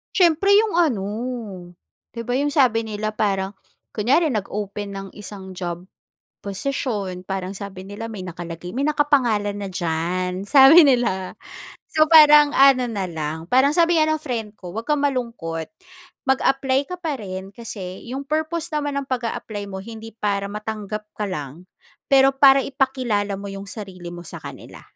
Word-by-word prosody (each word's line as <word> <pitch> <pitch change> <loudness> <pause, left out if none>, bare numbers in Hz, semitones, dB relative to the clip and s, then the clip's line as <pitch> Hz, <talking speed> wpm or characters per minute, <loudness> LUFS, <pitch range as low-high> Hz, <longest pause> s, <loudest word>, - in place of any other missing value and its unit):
Siyempre 345 +1 +3
'yong 420 -4 +3
ano, 260 - +2 1.1
'di 230 - -4
ba, 245 +3 -1
'yong 290 - +1
sabi 245 -6 +2
nila 215 0 -3
parang 195 -2 -1 0.4
kunyari 275 +9 +2
nag-open 205 -1 -4
ng 195 0 -6
isang 200 -2 -9
job 175 -1 -5 0.6
posisyon 200 -4 -3
parang 190 -1 -3
sabi 195 -1 -8
nila 205 +3 -7
may 215 -4 -7
nakalagay 175 0 -7
"May 280 - +1
nakapangalan 255 -9 +1
na 205 - -5
diyan." 180 +3 -2
Sabi 280 +8 +8
nila. 235 -8 +1 0.6
So, 310 -1 +4
parang 300 -2 +8
ano 265 -2 +6
na 200 -4 -2
lang, 160 -2 -5
parang 260 +2 +5
sabi 335 -1 +4
nga 310 - +3
ng 310 - +1
friend 230 -8 -5
ko, 180 -1 -9
"'Wag 225 +4 -6
kang 295 -1 +2
malungkot. 230 - -3 0.6
Mag-apply 270 +1 +1
ka 360 - -4
pa 305 -9 -4
rin 190 0 -7
kasi 195 -5 -7
'yong 270 +2 -5
purpose 315 +2 -2
naman 290 -1 -1
ng 280 - -2
pag-a-apply 230 -5 -4
mo 190 - -6
hindi 225 +3 -9
para 200 -2 -2
matanggap 210 0 -5
ka 210 -1 -3
lang, 165 +1 -7 0.4
pero 270 0 +5
para 270 0 +6
ipakilala 245 -8 -1
mo 200 - -8
'yong 195 0 -7
sarili 190 -5 -8
mo 175 0 -9
sa - - -9
kanila." - - -10
215 Hz, 155 wpm, -22 LUFS, 195-275 Hz, 1.1 s, Sabi